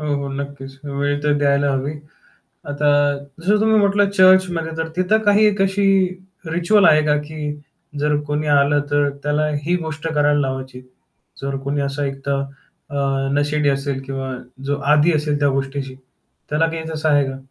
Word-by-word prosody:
हो, 150 -1 -1
हो, 140 0 -4
नक्कीच. 135 -1 -7
वेळ 145 0 -1
तर 150 0 +2
द्यायला 140 0 +2
हवी. 135 +2 -2 0.8
आता 145 +1 0 0.5
जसं 205 +4 +2
तुम्ही 220 0 +3
म्हटलं 200 0 +2
चर्चमध्ये 185 -4 +3
तर 160 0 -3
तिथं 185 +4 +2
काही 205 +1 +4
एक 205 -1 +1
अशी 195 +1 +1 0.6
रिच्युअल 175 +5 +2
आहे 155 0 +5
का 150 0 +3
की 150 -1 -5 0.5
जर 150 +1 +1
कोणी 150 +1 -2
आलं, 145 0 +3
तर 145 0 +2
त्याला 150 +1 0 0.2
ही 175 +3 +1
गोष्ट 160 0 -5
करायला 145 -1 +2
लावायची? 130 -1 -4 0.6
जर 140 0 -2
कोणी 140 +1 -1
असं 140 +1 -2
एकतर 135 0 -2 0.5
अ, 145 - -5 0.4
नशेडी 145 +1 +1
असेल 140 -1 -1
किंवा 135 -1 -4 0.3
जो 145 +1 -1 0.2
आदी 155 +3 +4
असेल 150 -1 0
त्या 145 0 +2
गोष्टीशी, 135 0 -3 0.6
त्याला 155 +2 +2
काही 165 0 -4
तसं 155 0 -2
आहे 145 -2 +4
का? 135 0 -5
145 Hz, 165 wpm, -20 LUFS, 140-160 Hz, 0.8 s, आहे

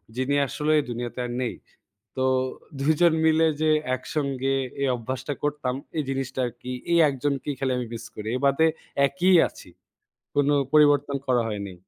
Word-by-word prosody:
যিনি 130 +2 0
আসলে 150 +4 -1
এই - - -1
দুনিয়াতে 120 +1 -5
আর 120 - -5
নেই। 125 - -2 0.6
তো 130 - 0 0.5
২ 140 +3 +3
জন 170 -2 +6
মিলে 160 0 +4 0.2
যে 155 - +3 0.3
একসঙ্গে 135 0 -2 0.3
এই 140 - +2
অভ্যাসটা 130 +4 -4
করতাম, 145 -3 -1 0.2
এই 150 - 0
জিনিসটা 135 -1 -3
আরকি। 120 +1 -7 0.2
এই 170 - +5
১ 140 - -2
জনকেই 145 0 -1
খালি 135 -1 0
আমি 125 - -3
মিস 115 - -7
করি। 105 +1 -6
এ - - -1
বাদে 140 +4 +4 0.4
একই 180 +7 +2
আছি। - - -14 0.6
কোনো 145 0 +3 0.2
পরিবর্তন 145 -2 +4
করা 125 -2 +3
হয়নি। 100 -3 -5
135 Hz, 165 wpm, -25 LUFS, 125-145 Hz, 0.6 s, জন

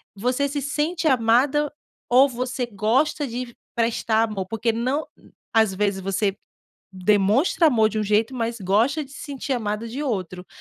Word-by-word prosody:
você 250 +7 0
se 285 0 -3
sente 310 +4 -1
amada 265 +4 +3 0.3
ou 265 +3 +5
você 250 0 -3
gosta 240 +9 +1
de 240 0 -6 0.2
prestar 225 -1 +1
amor. 195 -3 -4
Porque 225 +2 0
não 255 +7 -1 0.5
às 220 -4 +3
vezes 200 -1 -1
você 195 +1 -1 0.6
demonstra 210 - +3
amor 225 -7 +4
de 220 - -3
um - - +1
jeito, 220 +5 +1
mas 230 -1 -2
gosta 225 - +1
de 270 - -18
se 275 - -11
sentir 275 -1 -4
amada 215 -2 -2
de 260 +6 -5
outro. 185 - -3
235 Hz, 160 wpm, -23 LUFS, 210-275 Hz, 0.6 s, ou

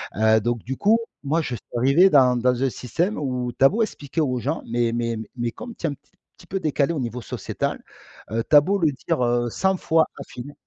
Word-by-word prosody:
Heu, 110 +1 +4
donc 120 +1 -2
du 135 +2 -5
coup, 220 +3 +3 0.2
moi, 155 +4 +1
je 125 -6 -3
suis 110 - -12
arrivé 140 +10 +5
dans 130 -6 +5
dans 125 +1 +1
un 135 - +2
système 165 - -2
où 125 -4 -2
tu 135 - +2
as - - +11
beau 225 +4 -1
expliquer 160 -7 -2
aux 130 -4 0
gens, 145 +7 -2
mais 120 0 0
mais 115 -1 -1 0.2
mais 120 -1 -2
comme 235 - -9
tu - - -6
es - - 0
un - - -3
petit - - -38 0.3
petit 175 - -16
peu 195 +1 -3
décalé 150 -1 +1
au 155 - -3
niveau 120 0 -4
sociétal, - - -4 0.5
heu, 115 +1 0
tu - - +5
as 145 - +10
beau 195 +7 0
le 160 -4 +3
dire, 125 - -2
heu, 120 0 +1
100 190 +10 +1
fois 160 -3 +2
d'affilée 140 +4 -9
130 Hz, 240 wpm, -23 LUFS, 120-160 Hz, 0.5 s, as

